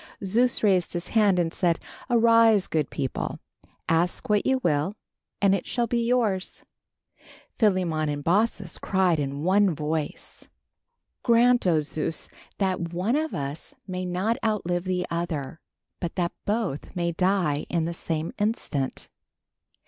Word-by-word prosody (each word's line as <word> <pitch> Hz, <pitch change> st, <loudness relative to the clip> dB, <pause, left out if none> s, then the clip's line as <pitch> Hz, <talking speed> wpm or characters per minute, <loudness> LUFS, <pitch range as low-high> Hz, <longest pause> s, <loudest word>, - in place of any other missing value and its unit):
Zeus 235 Hz, +6 st, +2 dB
raised 190 Hz, -4 st, +3 dB
his 175 Hz, 0 st, -3 dB
hand 210 Hz, -4 st, +3 dB
and 165 Hz, -2 st, 0 dB
said, 170 Hz, -3 st, +1 dB, 0.3 s
"Arise, 230 Hz, -3 st, +5 dB
good 155 Hz, -3 st, -1 dB
people, 135 Hz, -3 st, -3 dB, 0.5 s
ask 165 Hz, +2 st, +1 dB
what 210 Hz, -1 st, +2 dB
you 265 Hz, 0 st, +3 dB
will 150 Hz, +7 st, +1 dB, 0.4 s
and 200 Hz, -1 st, +4 dB
it 195 Hz, -, -1 dB
shall 240 Hz, -1 st, 0 dB
be 235 Hz, +1 st, 0 dB
yours." 230 Hz, -6 st, 0 dB, 1.0 s
Philemon 180 Hz, -8 st, +2 dB
and 145 Hz, 0 st, -3 dB
Baucis 200 Hz, 0 st, +1 dB
cried 185 Hz, -4 st, +2 dB
in 140 Hz, +1 st, -3 dB
one 190 Hz, 0 st, +3 dB
voice: 155 Hz, 0 st, -4 dB, 0.7 s
"Grant, 240 Hz, -2 st, +4 dB
oh 160 Hz, -3 st, +3 dB
Zeus, 155 Hz, +2 st, -3 dB, 0.3 s
that 185 Hz, -4 st, -1 dB
one 185 Hz, +8 st, 0 dB
of 315 Hz, +1 st, -1 dB
us 145 Hz, -, -5 dB
may 185 Hz, -1 st, -4 dB
not 185 Hz, +6 st, 0 dB
outlive 180 Hz, -5 st, 0 dB
the 180 Hz, -1 st, -1 dB
other, 165 Hz, -3 st, -3 dB, 0.4 s
but 170 Hz, -2 st, -4 dB
that 175 Hz, -2 st, 0 dB
both 205 Hz, -7 st, -2 dB
may 170 Hz, -1 st, 0 dB
die 175 Hz, -4 st, +1 dB
in 170 Hz, -2 st, 0 dB
the 170 Hz, -, -3 dB
same 165 Hz, -1 st, -3 dB
instant." 185 Hz, -, -2 dB
180 Hz, 140 wpm, -26 LUFS, 165-210 Hz, 1.0 s, Arise